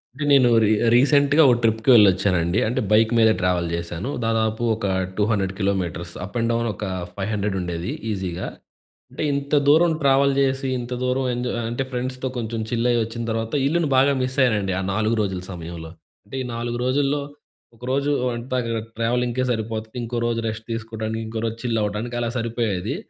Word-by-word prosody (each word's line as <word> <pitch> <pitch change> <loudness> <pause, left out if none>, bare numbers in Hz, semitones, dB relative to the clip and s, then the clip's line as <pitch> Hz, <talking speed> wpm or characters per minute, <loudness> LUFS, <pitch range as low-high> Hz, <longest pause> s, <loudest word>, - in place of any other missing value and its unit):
అంటే 145 - -4
నేను 130 -3 +6
రీ 105 - +3 0.2
రీసెంట్‌గా 145 +4 +5
ఓ - - +7
ట్రిప్‌కి 110 +2 +2
వెళ్ళొచ్చానండి. 95 -3 +4
అంటే 120 - 0
బైక్ 110 +1 +5
మీద 110 -1 +6
ట్రావెల్ 90 -2 +1
చేశాను. 85 +7 -4
దాదాపు 110 0 0
ఒక 110 - -7 0.3
200 105 -3 +1
కిలోమీటర్స్. 90 -4 -2
అప్ 100 +5 -9
అండ్ 115 0 0
డౌన్ 115 0 0
ఒక 105 - -6 0.3
ఫైవ్ 100 +1 -3
హండ్రెడుండేది 95 -4 -2 0.2
ఈసీగా. 95 -4 -3 0.7
అంటే - - -4
ఇంత 140 +1 -3
దూరం 160 +4 +5
ట్రావెల్ 140 0 +4
జేసి, 135 0 +1
ఇంత 120 +1 -5
దూరం 130 +1 0
ఎంజాయ్ 125 0 -2
అంటే 120 +3 -2
ఫ్రెండ్స్‌తో 130 +1 -3
కొంచెం 115 -1 -3
చిల్ 120 0 +1
అయ్యొచ్చిన 115 0 -1
తర్వాత, 115 0 -3
ఇల్లుని 165 0 +1
బాగా 135 +2 +5
మిస్ 130 +1 -2
అయ్యానండి 105 -7 +2
ఆ - - -1
4 110 +3 +1
రోజుల 95 -3 -2
సమయంలో. 85 -2 -7 0.3
అంటే 105 - -9
ఈ - - -2
4 120 0 -3
రోజుల్లో, 140 +2 +1 0.5
ఒకరోజు 135 +4 -1 0.2
అంతా 125 +2 -3 0.4
ట్రావెలింగ్‌కే 120 +2 0
సరిపోతది. 110 -1 -4
ఇంకో 120 +1 -3
రోజు 115 -1 -1
రెస్ట్ 110 0 -5
తీసుకోడానికి, 110 0 -4
ఇంకో 110 0 -4
రోజు 115 0 -3
చిల్ 115 -2 0
అవ్వటానికి 105 +4 -3
అలా 120 -1 -1
సరిపోయేది. 115 -1 -2
115 Hz, 165 wpm, -22 LUFS, 105-125 Hz, 0.7 s, ఓ